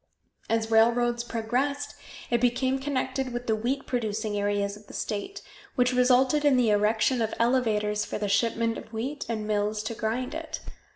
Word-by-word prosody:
As 225 0 0
railroads 235 +1 +3
progressed, 255 +5 -1 0.4
it 235 -1 +2
became 255 +2 +2
connected 265 -1 -2
with 240 0 -4
the 220 - +2
wheat 250 +6 -2
producing 220 -3 -2
areas 205 0 0
of 210 0 -16
the - - -11
state, 215 - -4 0.3
which 250 -2 +3
resulted 255 +3 +4
in 285 -3 +5
the 235 -3 +3
erection 220 +4 +2
of 225 -1 -1
elevators 220 -4 +1
for - - -4
the 210 - -2
shipment 230 +2 +1
of - - -13
wheat 255 +6 -4
and 220 -2 -2
mills 210 0 0
to 220 - -3
grind 240 +5 -2
it. 320 0 -5
235 Hz, 170 wpm, -27 LUFS, 215-255 Hz, 0.4 s, in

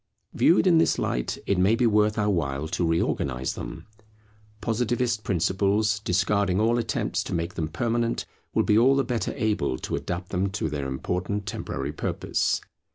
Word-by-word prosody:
Viewed 175 - +4
in 170 -3 +5
this - - +3
light, - - -1
it 100 -2 +1
may 100 +5 +4
be 125 +1 +2
worth 105 -1 +3
our 105 -1 +2
while 75 -4 -1
to 90 - -1
reorganize 65 -6 0
them. - - -7 0.7
Positivist 115 +1 0
principles, 100 +3 +1
discarding 100 -1 +1
all 115 +2 +3
attempts 115 -2 -1
to - - -3
make 85 0 -2
them 80 - -2
permanent, 115 +7 -1 0.3
will - - +2
be 105 +1 +4
all 130 +4 +5
the 135 - +2
better 120 -6 -2
able 105 - 0
to - - -3
adapt 90 +1 -4
them 95 +1 0
to 100 -6 -1
their 70 -2 -3
important 90 +9 -2
temporary 70 -7 -4
purpose. - - -1
100 Hz, 165 wpm, -26 LUFS, 85-115 Hz, 0.7 s, in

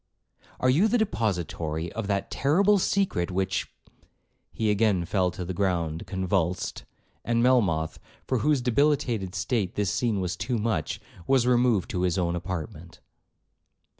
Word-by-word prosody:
—Are 130 - +1
you 170 +11 +4
the 245 - +2
depository 85 - -2
of 115 -3 -4
that 100 -1 -1
terrible 195 +9 +3
secret 185 - 0
which—' 95 0 -1 0.8
He 110 -2 0
again 100 -4 +2
fell 95 -1 +1
to 90 0 -6
the 95 - -4
ground 85 -4 -1
convulsed, 95 -2 -1 0.4
and 115 0 +1
Melmoth, 95 -12 +2 0.3
for 130 - 0
whose 145 +1 +2
debilitated 125 -6 +1
state 95 +1 -1
this 105 -1 0
scene 115 -5 0
was 90 -1 -2
too 120 +6 -2
much, 105 -8 -1 0.3
was 135 -3 +3
removed 120 -6 +2
to 90 - -1
his 90 -1 +1
own 85 -2 0
apartment. 85 -2 -6
100 Hz, 140 wpm, -26 LUFS, 90-125 Hz, 0.8 s, you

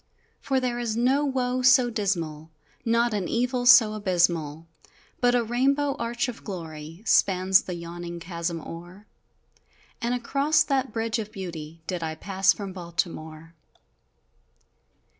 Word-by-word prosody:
For 270 -1 0
there 245 -2 -2
is 230 -2 -2
no 260 +4 +2
woe 255 -2 0
so 255 -1 +5
dismal, 165 -8 -2 0.3
Not 230 0 +2
an 195 -4 -1
evil 245 +1 0
so 225 -3 +8
abysmal, 170 -6 0 0.5
But 245 0 +3
a 240 - +2
rainbow 275 +5 +1
arch 235 +2 -1
of 245 - -7
glory 165 -2 -8
Spans 190 -2 +4
the 180 - -6
yawning 170 0 -7
chasm 170 -1 -4
o'er! 175 +6 -10 1.0
And 240 +1 0
across 275 +5 +2
that 265 -3 -1
Bridge 225 +1 -1
of 215 -1 -5
Beauty 165 -5 -8
Did 180 -1 -3
I 160 -1 -3
pass 195 +3 +2
from 195 -2 -5
Baltimore! 165 -2 -5
205 Hz, 135 wpm, -26 LUFS, 170-245 Hz, 1.0 s, so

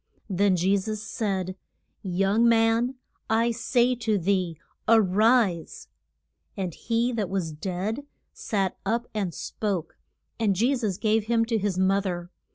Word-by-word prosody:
Then 195 +1 +3
Je 185 +3 +2
sus 215 +2 -3
said, 195 -4 -2 0.5
Young 195 +5 +2
man, 230 +2 +3 0.3
I 230 +2 +3
say 245 +2 +2
to 220 -3 0
thee 185 -3 0 0.3
a 225 0 +7
rise. 210 -2 +2 0.7
And 185 -4 -3
he 235 +5 0
that 210 -5 -1
was 185 -4 -2
dead 190 - -4 0.3
sat 195 -4 -2
up 230 +4 0
and 200 -5 -1
spoke. 185 -1 -4 0.4
And 210 -4 +2
Je 240 +8 +2
sus 215 -7 -2
gave 215 0 +1
him 230 0 +2
to 225 -1 0
his 200 -2 -1
mo 190 +1 +3
ther. 175 -2 -4
205 Hz, 145 wpm, -26 LUFS, 185-230 Hz, 0.7 s, a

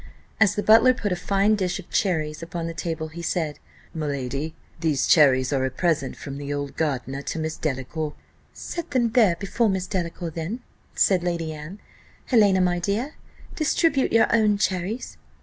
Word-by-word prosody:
As 200 -3 +4
the 205 - -1
butler 230 +4 +6
put 205 -5 -2
a - - +2
fine 200 +3 +2
dish 185 -4 0
of 195 - -10
cherries 155 -5 0
upon 165 0 -5
the 165 - -4
table, 160 -1 -4
he 170 +2 -8
said, 160 -3 -2 0.3
"My 155 -2 -3
lady, 140 +3 -3 0.2
these 155 -4 +1
cherries 130 -4 +5
are 135 -1 +1
a 130 - +1
present 140 -1 -1
from 140 0 -7
the 145 0 -5
old 145 -1 -4
gardener 135 -3 -2
to 150 - -4
Miss 160 0 -2
Delacour." 150 +2 -3 0.4
"Set 340 -1 -6
them 250 -4 +2 0.3
before 215 +4 +1
Miss 190 -2 -1
Delacour 170 -2 -3
then," 170 +10 -4 0.3
said 185 -3 +3
Lady 170 -2 -2
Anne. 155 +6 -8 0.5
"Helena, 205 -6 +4
my 175 -1 +2
dear, 210 - -2 0.4
distribute 310 -2 +2
your 225 - +5
own 210 -2 +3
cherries." 190 +4 -2
170 Hz, 170 wpm, -24 LUFS, 150-200 Hz, 0.5 s, butler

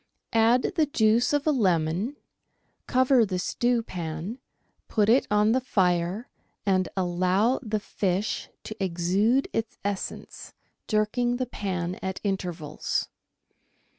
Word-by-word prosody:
Add 230 +8 +3
the 310 -2 +3
juice 230 -2 +3
of 290 -1 +1
a 310 - +4
lemon, 185 - +1 0.7
cover 255 -1 +4
the 190 -4 -1
stewpan, 190 -3 -2 0.5
put 210 -1 +2
it 250 +4 +4
on 210 +1 +3
the 260 +2 +2
fire, 185 -1 0 0.4
and 185 -2 +2
allow 185 +6 +2
the 215 -3 -2
fish 195 0 -2
to 215 -2 -5
exude 190 +9 +1
its 225 0 -2
essence, 200 -1 -5 0.3
jerking 235 +3 +1
the 255 - -1
pan 185 -6 -3
at 190 0 -3
intervals. 175 -7 -2
210 Hz, 115 wpm, -26 LUFS, 180-240 Hz, 0.7 s, a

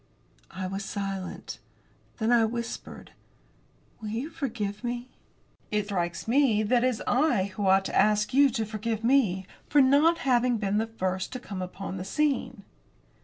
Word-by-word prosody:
I 190 0 -5
was 195 +2 -4
silent. 195 -2 -5 0.6
Then 225 0 0
I 235 -2 +5
whispered: 235 +1 -6 0.9
"Will 215 - -5
you 240 +9 -4
forgive 215 -7 -4
me?" 240 +1 -4 0.6
"It 210 -1 0
strikes 175 -3 -3
me 235 -4 +3
that 240 +3 +2
it - - +4
is 245 -4 -2
I 245 -7 +2
who 200 -1 -1
ought 190 0 +4
to - - -4
ask 210 +2 +3
you 280 +1 +6
to 225 -3 -2
forgive 220 +1 -3
me 225 -7 +2 0.2
for 295 - +4
not 285 +5 +5
having 245 -2 +3
been 205 0 0
the 225 - -1
first 190 -3 -3
to 255 - -4
come 200 -6 -6
upon 190 +1 -6
the 180 - -4
scene." 255 -1 -1
220 Hz, 165 wpm, -27 LUFS, 195-250 Hz, 0.9 s, you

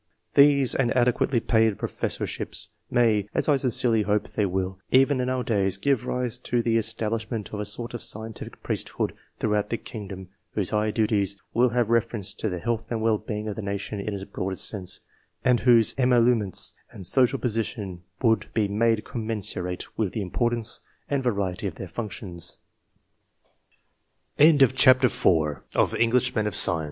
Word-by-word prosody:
These 140 -2 +5
and 130 -3 +1
adequately 125 0 +2
paid 110 -2 +2
profes - - -3
sorships - - -4 0.2
may, 110 -4 +2
as - - +1
I 145 -2 +4
sincerely 125 -4 +2
hope 105 0 0
they 105 -2 0
will, 95 0 -2
even 130 0 +4
in 125 - -1
our 130 -1 -1
days, 95 -5 0
give 130 +2 0
rise 125 -2 -2
to 120 -1 -1
the 115 -1 +2
establishment 110 0 -3
of 105 - -3
a 105 - -2
sort 115 +4 -4
of 120 - -5
scientific 110 0 -7
priesthood - - -2 0.2
throughout 105 -1 0
the 115 - -1
kingdom, 95 -5 -8 0.3
whose 100 -4 0
high 105 0 +1
duties 105 -3 +1 0.2
would 120 +1 +3
have 120 -2 +1
re 115 0 +5
ference 105 -2 -5
to 110 - -1
the 90 - -3
health 115 +5 -2
and 115 -2 -2
well 110 -2 +2
being 105 0 -5
of 105 - -3
the 110 - -5
nation 100 +1 -4
in 100 +2 -3
its 95 - -5
broadest 95 -1 -3
sense, 95 -4 -4 0.4
and 125 -2 +4
whose 120 -3 +4
emolu 125 -1 +4
ments 100 -5 -2 0.2
and 95 - -11
social 130 +7 +4
position 110 -6 -3 0.2
would 110 -2 +3
be 105 -2 +2
made 110 +2 +1
commensurate 105 -6 -4
with 105 -5 0
the 110 - -2
importance 120 +4 -1 0.3
and 140 -1 +1
variety 100 -6 -1
of 90 - -6
their 95 - -7
110 Hz, 155 wpm, -25 LUFS, 100-120 Hz, 0.4 s, These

